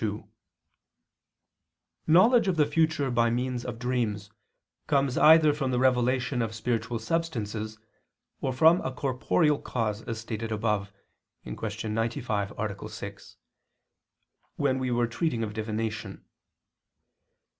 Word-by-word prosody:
2: 105 -1 -3 1.8
Knowledge 200 +8 +5
of 185 - +2
the 150 -2 +4
future 150 -2 +1
by 115 -1 +3
means 125 +1 -2
of 120 -2 -5
dreams, 115 -4 -2 0.6
comes 135 -3 +1
either 155 -1 +6
from 140 -3 -2
the 125 - 0
revelation 125 -1 +2
of 110 -1 -3
spiritual 115 +1 -2
substances, 110 -6 -3 0.6
or 135 - -1
from 160 +7 +5
a 130 - -3
corporeal 140 +3 +1
cause, 110 -3 -2
as 115 -1 -5
stated 115 0 -5
above 105 -2 -1 0.5
(Q. 105 - -5
95, 110 -2 -1
A. 105 -2 -4
6), - - -9 1.2
when 130 -2 +1
we 130 -1 -1
were 120 0 +2
treating 120 0 -1
of 105 -1 -4
divination. 110 0 -4
120 Hz, 120 wpm, -27 LUFS, 110-135 Hz, 1.8 s, either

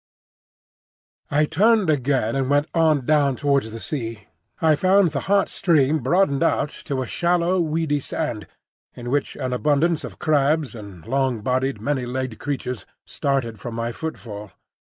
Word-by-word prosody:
I 150 +1 +3
turned 210 +4 +3
again 130 -5 0
and 135 -1 0
went 145 +1 +2
on 155 -5 +2
down 145 -2 +3
towards 140 -4 0
the 115 - -7
sea. 115 -6 -5 0.3
I 160 -2 +4
found 185 +1 +3
the 140 - -2
hot 200 -1 +4
stream 155 -3 +2
broadened 140 +1 +2
out 145 - +2 0.2
to 135 -2 -1
a - - -5
shallow, 175 +6 +1
weedy 160 -2 0
sand, 130 -6 -4 0.5
in 120 0 -6
which 145 0 -1
an 130 -1 -3
abundance 150 +5 +1
of - - -8
crabs 150 -3 +1
and 100 -7 -11
long 130 -2 0
bodied, 130 +1 0
many 130 +2 -1
legged 130 -2 -4
creatures 130 -5 -4 0.2
started 130 -6 -2
from 115 +3 -6
my 115 0 -2
footfall. 105 -8 -7
140 Hz, 150 wpm, -22 LUFS, 120-155 Hz, 0.5 s, I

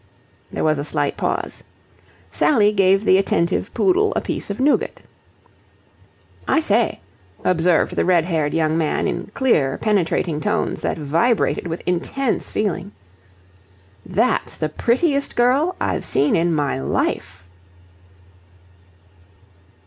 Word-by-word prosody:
There - - -3
was 155 -2 +2
a - - -2
slight 145 -1 -1
pause. - - -3 0.7
Sally 210 -8 +3
gave 195 0 +3
the 190 - +5
attentive 170 -3 0
poodle 390 +2 +2
a - - 0
piece - - -4
of 200 - -4
nougat. 285 +3 +1 1.5
"I - - +3
say," 230 -6 0 0.4
observed 175 -2 +2
the - - +1
red 175 -3 +3
haired 160 -4 -1
young 160 0 +1
man 155 -2 0
in 180 - -3
clear, 150 - +2
penetrating 175 -6 0
tones 210 +1 -1
that - - -2
vibrated 165 - 0
with 165 +1 -5
intense 225 +9 -1
feeling, 200 -1 -2 1.1
"that's 210 +8 0
the 155 - -2
prettiest 280 - 0
girl 270 +9 +2
I've - - -1
seen 145 - +1
in 170 +1 +1
my 145 - -1
life!" 90 +6 -2
185 Hz, 120 wpm, -20 LUFS, 160-235 Hz, 1.5 s, the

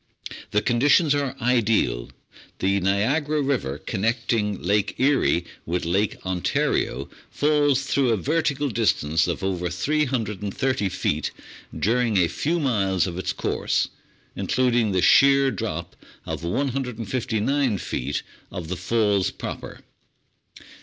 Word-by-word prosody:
The 105 - +1
conditions 145 +5 +4
are 140 -2 -1
ideal. 115 - +1 0.5
The 100 +1 +1
Niagara 130 - +1
River, 130 - -1
connecting 110 - -1
Lake 100 +3 0
Erie 130 -10 +2 0.2
with 85 +1 -2
Lake 95 +5 0
Ontario, 90 -6 0 0.2
falls 145 -2 +2
through 140 -2 +1
a 115 - +2
vertical 145 - 0
distance 80 -8 +1
of 90 +2 -3
over 90 -2 -1
330 115 - -1
feet 95 - -1 0.5
during 115 0 +1
a 90 -2 +4
few 165 - -1
miles 100 - +1
of 90 -1 -4
its - - -1
course, - - -1 0.5
including 120 -4 +1
the 95 -2 +1
sheer 135 0 +6
drop 105 - -4 0.3
of - - -5
159 125 +1 -1
feet 70 -5 -3 0.3
of 85 -3 -6
the 90 - -3
Falls 100 0 +1
proper. - - -7
115 Hz, 115 wpm, -24 LUFS, 95-135 Hz, 0.5 s, sheer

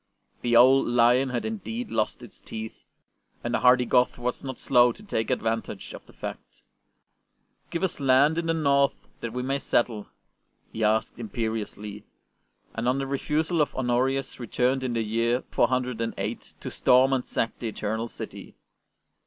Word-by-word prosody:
The 120 -1 +1
old 130 +3 +6
lion 120 +2 +4
had 125 -2 -2
indeed 225 +2 -4
lost 110 - -1
its - - -13
teeth, 110 0 -6 0.7
and - - -2
the - - +2
hardy 125 0 +5
Goth 125 +1 +2
was 120 0 -3
not 130 -2 -5
slow 125 -2 +4
to 210 - -13
take 115 - -2
advantage 115 0 -2
of - - -10
the - - -15
fact. - - -9 0.6
" - - -45
Give 170 - -3
us 190 - -1
land 140 +4 +4
in 165 - -3
the 165 - +2
North 140 -3 +3 0.2
that 115 - -5
we 125 +2 -3
may 135 +2 -1
settle," 115 -5 0 0.7
he 110 - -2
asked 110 +2 +1
imperiously, 105 -2 -4 0.7
and 115 +2 -1
on 130 - +1
the 135 - -1
refusal 150 +4 0
of 150 - 0
Honorius 130 +2 0
returned 125 +2 0
in 125 -2 -1
the 115 -1 0
year 115 +3 0
408 125 -3 -1
to - - -5
storm 130 +2 +4
and 130 -2 +1
sack 115 - -2
the 120 - -3
Eternal 110 +1 -3
City. - - -9
125 Hz, 165 wpm, -26 LUFS, 115-135 Hz, 0.7 s, old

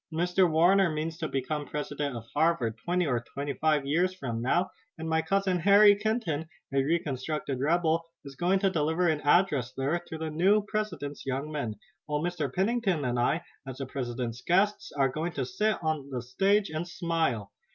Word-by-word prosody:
Mr. 175 +3 +2
Warner 175 +4 +4
means 160 +1 -3
to 155 - -2
become 145 +2 -3
president 145 -2 -3
of 115 - -9
Harvard, 150 -8 +1
twenty 175 +8 -1
or 125 -5 +1 0.2
twenty 140 0 -2
five 150 -1 +1
years 175 +6 +1
from 120 -9 -4
now, 175 +9 +1 0.3
and 160 0 -5
my 160 0 +2
cousin 195 0 +1
Harry 205 +3 +7
Kenton, 205 -8 -1 0.3
a 135 - +3
reconstructed 145 -2 -2
rebel, 165 +3 +2 0.2
is 140 -1 -9
going 180 +6 +2
to 195 -2 +3
deliver 160 +2 +1
an 155 -3 +1
address 145 -6 +3
there 145 +6 0
to 160 - -6
the 160 0 -4
new 195 +6 +3
president's 175 -10 -3
young 135 +3 -3
men, 120 -8 -3 0.3
while 150 -1 -1
Mr. 170 -6 -2
Pennington 195 - 0
and 120 -1 0
I, 160 +7 +1 0.2
as 130 -1 -6
the 135 - -4
president's 125 -2 -4
guests, 195 +8 +1
are 140 -2 +2
going 160 +6 -3
to 135 -3 -2
sit 210 - 0
on 155 -3 -1
the 125 -3 -4
stage 195 - +1
and 160 +2 -3
smile. 165 - -1
160 Hz, 185 wpm, -28 LUFS, 140-180 Hz, 0.3 s, Harry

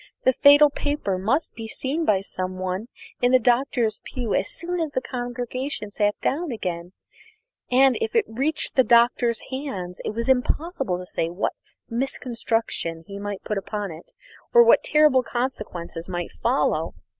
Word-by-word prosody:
The 260 - +4
fatal 285 +2 +7
paper 285 -12 -2
must 260 - 0
be 225 -1 -7
seen 280 +8 -2
by 195 -7 +3
some 185 -1 -5
one 185 +4 -3 0.3
in 245 0 +3
the 255 - +7
Doctor's 240 -2 +1
pew 245 -5 -4
as - - 0
soon 355 +1 -3
as 320 -2 -1
the 270 - -1
congregation 245 -2 -4
sat 205 -1 +1
down 320 +2 -1
again; 180 -5 -4 0.8
and, 260 +1 +5
if 455 +1 -2
it 455 -3 +4
reached 285 +7 -2
the 260 - +6
Doctor's 235 0 +3
hands, 200 -10 -5
it - - -4
was 230 0 -2
impossible 265 - 0
to 180 - -7
say 165 -2 -2
what 175 +4 -2 0.3
misconstruction 230 -8 -2
he 200 +2 -8
might 205 -1 -5
put 210 -2 -2
upon 205 0 -4
it 160 +1 -12 0.4
or 475 - +10
what 475 +1 +6
terrible 300 -4 +4
consequences 215 -9 -4
might 175 -1 -4
not - - -24
follow. - - +1
240 Hz, 165 wpm, -24 LUFS, 195-270 Hz, 0.8 s, or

